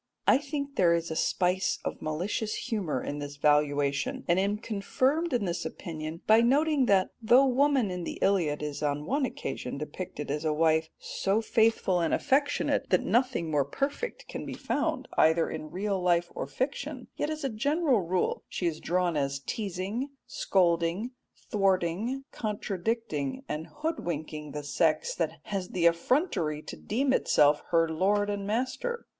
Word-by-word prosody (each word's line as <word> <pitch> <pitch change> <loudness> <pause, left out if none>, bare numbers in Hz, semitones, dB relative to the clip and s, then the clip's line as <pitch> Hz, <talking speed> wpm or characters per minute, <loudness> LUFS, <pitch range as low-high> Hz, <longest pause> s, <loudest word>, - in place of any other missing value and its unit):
I - - +6
think 280 -1 -5
there 170 -2 +5
is 170 0 -2
a - - -2
spice 180 +3 +1
of - - -4
malicious 180 +8 -2
humour 180 - -2
in 145 - -4
this 145 0 -6
valuation, 145 -1 +1
and 170 +2 +3
am 200 +2 +1
confirmed 260 +10 0
in 235 -5 +1
this 175 -1 -2
opinion 160 0 -6
by 220 +1 +6
noting 280 +2 +3
that 190 -2 +3
though 245 +4 +6
woman 265 -4 +3
in 180 -1 -4
the - - -5
Iliad 170 -7 +1
is 150 -1 -4
on 145 0 -1
one 275 - +1
occasion - - -5
depicted 150 -6 -5
as 150 +2 -2
a 155 - +1
wife 160 0 +2
so 195 +2 -1
faithful 220 -5 +2
and 165 -2 +2
affectionate 285 +1 +1
that - - +3
nothing 240 -10 +1
more 145 -2 +3
perfect 285 - -3
can - - -6
be - - -6
found - - -1
either 160 +1 +4
in 155 -1 -6
real 195 +1 -2
life 175 -1 +2
or - - -4
fiction, 270 - -3
yet 295 - -1
as 310 -1 -4
a - - +1
general 280 +3 +2
rule 180 +1 -1
she 180 - -3
is 160 -2 -1
drawn 180 -1 0
as 140 -1 0
teasing, 200 - -3 0.2
scolding, 175 +4 +1 0.4
thwarting, 195 +5 +1
contradicting, 210 - -2
and 155 +2 -4
hoodwinking 160 - -4
the 150 +1 -5
sex 480 - +1
that - - -3
has 195 -3 -4
the 175 -2 0
effrontery 170 - +1
to - - -7
deem 260 +5 0
itself 150 - +4
her 165 -1 +3
lord 200 +6 +1
and 200 -1 -3
master. 260 - -2
190 Hz, 160 wpm, -29 LUFS, 160-250 Hz, 0.4 s, I